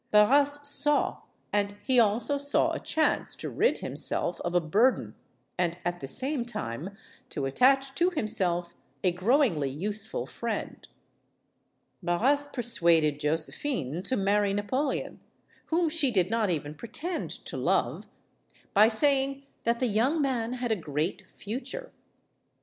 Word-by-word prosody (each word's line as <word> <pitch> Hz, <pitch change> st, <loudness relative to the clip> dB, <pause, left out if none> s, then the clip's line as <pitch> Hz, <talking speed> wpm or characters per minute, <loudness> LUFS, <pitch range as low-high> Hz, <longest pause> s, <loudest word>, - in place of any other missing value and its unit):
Barras 285 Hz, +7 st, +4 dB
saw; 290 Hz, 0 st, +3 dB, 0.3 s
and 205 Hz, 0 st, 0 dB
he 260 Hz, -2 st, +3 dB
also 235 Hz, +6 st, +2 dB
saw 285 Hz, +1 st, +2 dB
a -, -, -3 dB
chance 315 Hz, -1 st, 0 dB
to -, -, -6 dB
rid 470 Hz, -, +2 dB
himself 170 Hz, 0 st, -1 dB
of 175 Hz, 0 st, -3 dB
a -, -, +6 dB
burden 205 Hz, +11 st, +2 dB, 0.5 s
and 170 Hz, -1 st, 0 dB
at 175 Hz, 0 st, -2 dB
the 135 Hz, -, -6 dB
same 265 Hz, -, -1 dB
time 190 Hz, -, -6 dB, 0.3 s
to 140 Hz, -, -3 dB
attach 265 Hz, -, +3 dB
to 345 Hz, +6 st, +2 dB
himself 180 Hz, -, -1 dB, 0.3 s
a 180 Hz, -, +3 dB
growingly 185 Hz, -, +2 dB
useful 205 Hz, +9 st, -3 dB
friend. 230 Hz, -2 st, -5 dB, 1.1 s
Barras 265 Hz, +12 st, +1 dB
persuaded 170 Hz, -, +2 dB
Josephine 160 Hz, -, -2 dB
to 225 Hz, +7 st, -1 dB
marry 200 Hz, 0 st, +2 dB
Napoleon 260 Hz, +8 st, -2 dB, 0.5 s
whom 335 Hz, +1 st, +1 dB
she 305 Hz, -3 st, +2 dB
did 190 Hz, -4 st, +1 dB
not 225 Hz, -3 st, +1 dB
even 150 Hz, -3 st, -2 dB
pretend 310 Hz, -, -5 dB, 0.2 s
to -, -, -6 dB
love -, -, 0 dB, 0.7 s
by 210 Hz, +2 st, +7 dB
saying 275 Hz, +3 st, +1 dB, 0.2 s
that 235 Hz, +1 st, +2 dB
the 255 Hz, -, 0 dB
young 245 Hz, +8 st, +1 dB
man 250 Hz, -5 st, 0 dB
had 245 Hz, -2 st, -3 dB
a -, -, +3 dB
great 155 Hz, -1 st, -3 dB
future. 275 Hz, -, -6 dB
220 Hz, 135 wpm, -28 LUFS, 175-275 Hz, 1.1 s, by